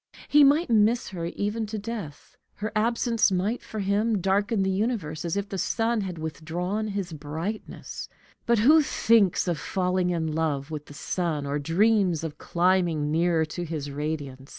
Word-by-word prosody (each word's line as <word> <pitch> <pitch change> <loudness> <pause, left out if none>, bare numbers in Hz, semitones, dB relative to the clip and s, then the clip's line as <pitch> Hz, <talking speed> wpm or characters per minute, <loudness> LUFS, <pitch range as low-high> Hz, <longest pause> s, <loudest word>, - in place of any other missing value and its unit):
He 295 0 +6
might 285 +1 +4
miss 225 +2 +3
her 175 -3 -5
even 210 +5 -2
to 215 +1 -4
death; 205 -9 -7 0.2
her 215 +1 -4
absence 230 0 +2
might, 195 +6 0
for 215 - -6
him, 205 +2 +1
darken 200 +3 +1
the 190 - +1
universe 190 -7 -2
as 170 +2 -2
if 200 0 -2
the 195 -1 -4
sun 225 +3 0
had 185 -3 -5
withdrawn 170 +7 -3
his 195 -4 -4
brightness; 160 +8 -6 0.4
but 235 0 +4
who 295 +9 +6
thinks 225 - +3
of 170 -3 0
falling 180 +1 0
in 170 -2 -1
love 155 -2 -1
with 150 -1 -6
the 145 - -12
sun, 160 -3 -2
or 140 +1 -1
dreams 180 +1 +2
of 155 -2 -6
climbing 170 -4 +1
nearer 165 0 +2
to 175 +3 -5
his 155 -4 -4
radiance? 145 -2 -4
185 Hz, 170 wpm, -26 LUFS, 160-215 Hz, 0.4 s, He